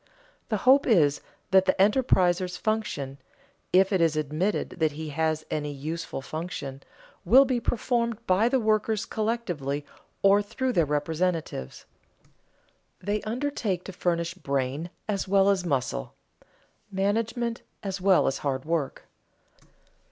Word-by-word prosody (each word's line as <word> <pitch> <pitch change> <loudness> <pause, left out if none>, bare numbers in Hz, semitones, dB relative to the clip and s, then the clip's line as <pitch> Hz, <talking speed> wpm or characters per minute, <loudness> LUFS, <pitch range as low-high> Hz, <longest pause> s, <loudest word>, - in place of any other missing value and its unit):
The 215 - +1
hope 270 +2 +6
is 155 - +4 0.3
that 190 0 +6
the 185 - +2
enterpriser's 185 -5 +3
function 150 -12 -2 0.5
(if 190 +2 +4
it 185 - +2
is 165 -2 +3
admitted 155 +7 -1
that 155 -2 +2
he 155 +1 -6
has 155 +1 -1
any 150 -1 -2
useful 155 +1 -5
function) 155 -4 -5 0.4
will 270 +2 +7
be 255 -2 0
performed 235 -1 0
by 200 +4 +3
the 265 +1 +2
workers 215 -1 +1
collectively 175 - -2 0.4
or 200 +1 +6
through 255 +5 -2
their 165 -7 +2
representatives. 155 - -2 1.1
They 205 +1 -2
undertake 225 -5 -2
to 195 - -8
furnish 170 -1 -1
brain 140 -1 -2 0.2
as 200 -3 -1
well 195 0 +4
as 185 -3 +1
muscle, 130 - -2 0.8
management 230 +4 -1 0.2
as 195 -2 -4
well 190 -1 +4
as 135 - 0
hand 135 -2 -2
work. 160 -4 -2
185 Hz, 130 wpm, -27 LUFS, 155-215 Hz, 1.1 s, will